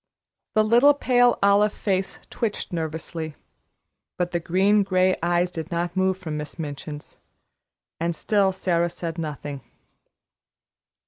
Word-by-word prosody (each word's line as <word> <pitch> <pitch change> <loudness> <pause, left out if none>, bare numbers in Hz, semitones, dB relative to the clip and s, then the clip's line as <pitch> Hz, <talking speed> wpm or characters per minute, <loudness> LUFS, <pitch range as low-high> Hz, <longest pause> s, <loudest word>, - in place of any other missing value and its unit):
The 215 - +5
little 240 +7 +5
pale 245 -3 +3
olive 205 +1 +4
face 190 -2 -1
twitched 215 -5 -3
nervously, 160 -1 -4 0.8
but 175 0 -1
the 175 - 0
green 195 +5 +3
gray 185 -1 +2
eyes 175 +1 +1
did 160 -1 -6
not 175 0 -2
move 190 0 +1
from 160 -5 -5
Miss 150 +1 -7
Minchin's, 150 -1 -7 0.8
and 170 +1 -1
still 200 +2 +2
Sara 175 -2 0
said 170 -1 -5
nothing. 145 -3 -5
175 Hz, 125 wpm, -24 LUFS, 165-200 Hz, 0.8 s, The